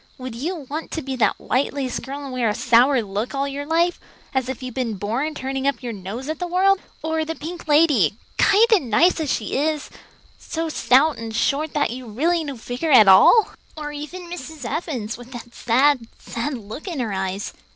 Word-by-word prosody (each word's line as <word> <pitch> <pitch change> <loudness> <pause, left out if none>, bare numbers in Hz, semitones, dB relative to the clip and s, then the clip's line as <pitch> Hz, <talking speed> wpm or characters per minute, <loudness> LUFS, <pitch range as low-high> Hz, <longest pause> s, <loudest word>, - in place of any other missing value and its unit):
Would 255 -2 -7
you 305 +5 -4
want 310 +4 -5
to 320 - -3
be 265 0 -4
that 235 - +2
white 260 +3 0
lace 265 -3 -2
girl 280 +2 -7
and 270 -2 -7
wear 245 -3 +1
a 210 - -1
sour 245 +2 +4
look 210 +6 -4
all 275 +1 0
your 285 +1 -5
life, 340 +2 +1 0.3
as 260 -1 0
if 260 0 -5
you'd 255 -1 -5
been 240 -4 -2
born 235 +11 -2
turning 270 +1 -2
up 270 -3 -1
your 240 -2 -4
nose 210 +7 -6
at 315 0 -3
the 355 - -2
world? 375 +2 +3 0.2
Or 320 0 0
the 325 +1 -4
pink 335 +2 -8
lady, 295 - +4 0.2
kind 415 +3 +6
and 295 - +2
nice 335 +11 +4
as 305 -4 -1
she 215 - -2
is, 300 +2 -1 0.5
so 325 0 -4
stout 290 0 +3
and 225 -1 -6
short 285 +6 0
that 285 -6 +1
you'd 240 -3 -8
really 330 +5 +1
no 280 -4 -6
figure 245 +7 -3
at 225 -6 +8
all? 195 - +7 0.3
Or 300 -1 -5
even 300 +5 -7
Mrs. 320 -5 -8
Evans, 260 -9 -4
with 245 +1 -12
that 240 0 -9
sad, 255 +1 +2
sad 240 +5 -4
look 225 - -9
in 335 -6 -4
her 225 -5 -2
eyes? 190 +1 -3
275 Hz, 210 wpm, -22 LUFS, 235-315 Hz, 0.5 s, at